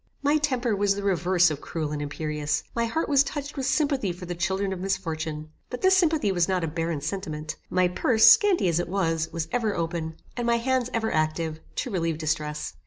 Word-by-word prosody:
My 290 +2 +3
temper 255 -6 0
was 200 0 +2
the 200 - -5
reverse 180 -2 +3
of 150 - -5
cruel 155 -3 -4
and 150 -1 -3
imperious. 150 0 -2
My 235 0 +1
heart 320 +8 -1
was 280 -2 +5
touched 285 0 -5
with 270 -2 -2
sympathy 275 - +1
for 180 +1 -8
the 175 - -4
children 190 +3 -1
of 185 - -6
misfortune. 160 -5 -3 0.2
But 250 - -6
this 380 0 +6
sympathy 315 - +2
was 175 -3 +2
not 185 -2 0
a - - 0
barren 165 -1 -2
sentiment. 155 -2 -4
My 185 0 +3
purse, 220 +5 +3
scanty 360 - +6
as 170 -1 +2
it 175 - -3
was, 165 -4 0
was 165 -1 -3
ever 225 -4 0
open, 165 -1 -3 0.2
and 240 -1 -2
my 235 0 +3
hands 255 +1 0
ever 225 -1 -1
active, 155 0 -1 0.2
to 250 - -3
relieve 165 -4 -1
distress. 155 -1 -2
185 Hz, 210 wpm, -26 LUFS, 160-235 Hz, 0.2 s, this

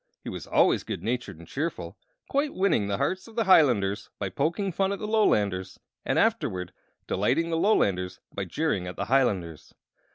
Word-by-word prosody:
He - - -5
was - - -7
always - - +3
good 85 - -5
natured 115 -5 -3
and 85 - -13
cheerful, 135 - -4 0.3
quite 285 +1 0
winning 180 - +2
the 100 -1 -1
hearts 185 - -1
of 225 - -14
the 230 - +2
Hilanders 120 - +3
by 100 - -3
poking 180 - -1
fun 195 +3 0
at 200 - -2
the 210 - -5
Lolanders, 100 - +1 0.2
and - - 0
afterward 90 0 0 0.3
delighting 130 - 0
the 165 - +1
Lolanders 95 - +1
by 100 - -3
jeering 100 - -1
at 90 - -6
the 100 - -3
Hilanders. 95 - 0
120 Hz, 175 wpm, -27 LUFS, -, 0.3 s, always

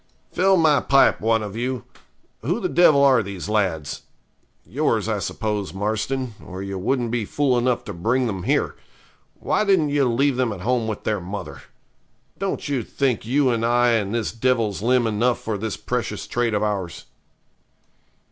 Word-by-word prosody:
'Fill 190 +2 +3
my 155 -4 +4
pipe, 135 0 +3
one 115 0 +2
of 105 -1 -6
you. 125 +2 -3 0.6
Who - - -1
the - - -1
devil 155 -5 +5
are 130 -4 +5
these 100 -3 -6
lads? 90 -9 -1 0.6
Yours, - - 0
I - - -1
suppose, 105 -3 -3
Marston, 110 +5 -2
or 95 0 -7
you 100 -1 -5
wouldn't 120 +3 -1
be 120 -2 0
fool 135 +4 +1
enough 120 0 +1
to 105 - -7
bring 115 +9 0
them 100 -5 -3
here. - - 0 0.6
Why - - 0
didn't 190 -7 +3
you 145 -1 +2
leave 135 +2 +1
them 125 -3 +1
at 100 -4 -6
home 120 +2 0
with 110 -2 -4
their 105 -3 -1
mother? 100 +4 -7 0.8
Don't 195 -4 -3
you 140 -3 0
think 125 -1 -1
you 135 +1 +2
and 115 -1 -1
I 120 +1 +3
and 105 -4 0
this 115 -2 -1
devil's 115 -4 0
limb 125 +1 +2
enough 115 +3 +1
for 110 - -3
this 110 +2 -4
precious 120 -4 -3
trade 120 -2 -1
of 105 - 0
ours?' 100 -5 -3
115 Hz, 175 wpm, -22 LUFS, 105-130 Hz, 0.8 s, devil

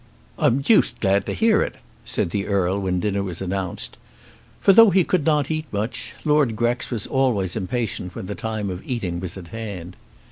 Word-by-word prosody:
"I'm 125 +4 +3
deuced 210 +10 +3
glad 100 0 +2
to - - -1
hear 225 -1 +4
it," - - -2 0.3
said 85 - -1
the 100 +1 -2
Earl 100 -1 +1
when 90 -1 0
dinner 100 0 0
was 90 -4 -4
announced. 95 -1 -3 0.6
For, 195 - +5
though 225 +2 +9
he 190 0 +4
could 165 -2 0
not 150 -1 +2
eat 155 -1 -2
much, 105 +3 -3
Lord 150 -6 +3
Grex 120 +2 0
was 115 -5 -2
always 115 -9 0
impatient 105 -3 -3
when - - -5
the 105 - -4
time 110 -3 -3
of 90 0 -6
eating 95 -9 -3
was 90 0 -6
at 85 -3 -10
hand. 100 -6 -6
105 Hz, 190 wpm, -23 LUFS, 95-135 Hz, 0.6 s, though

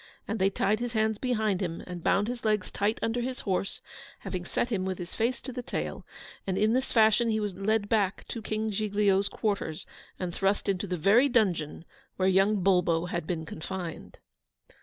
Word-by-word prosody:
And 220 - -2
they 190 +1 +4
tied 210 +2 +1
his 240 -1 -3
hands 220 -1 +1
behind 220 -6 0
him, 170 -3 -3
and 175 -2 -7
bound 205 +2 +3
his 245 0 -4
legs 215 -3 +1
tight 205 +2 0
under 230 +2 0
his 255 +1 -3
horse, 195 -1 -2 0.4
having 180 -2 -4
set 240 - -1
him 200 -6 0
with 190 -1 -2
his 175 0 -7
face 235 +3 0
to 260 - -6
the 250 - -4
tail; - - -4 0.4
and 190 -1 0
in 215 +2 +3
this 260 +1 0
fashion 225 +1 +4
he 220 -1 +1
was 205 -3 -2
led 205 +2 +1
back 205 -3 +1
to 230 - -4
King 215 0 -2
Giglio's 200 -1 +2
quarters, 200 -8 -2 0.3
and 180 -2 -3
thrust 195 +3 0
into 195 0 0
the 180 -1 -2
very 220 - +5
dungeon 175 - +1 0.3
where 185 - +1
young 195 +1 +3
Bulbo 175 -2 +3
had 170 -2 -3
been 165 -3 -2
confined. 170 +1 -6
205 Hz, 195 wpm, -29 LUFS, 185-220 Hz, 0.4 s, very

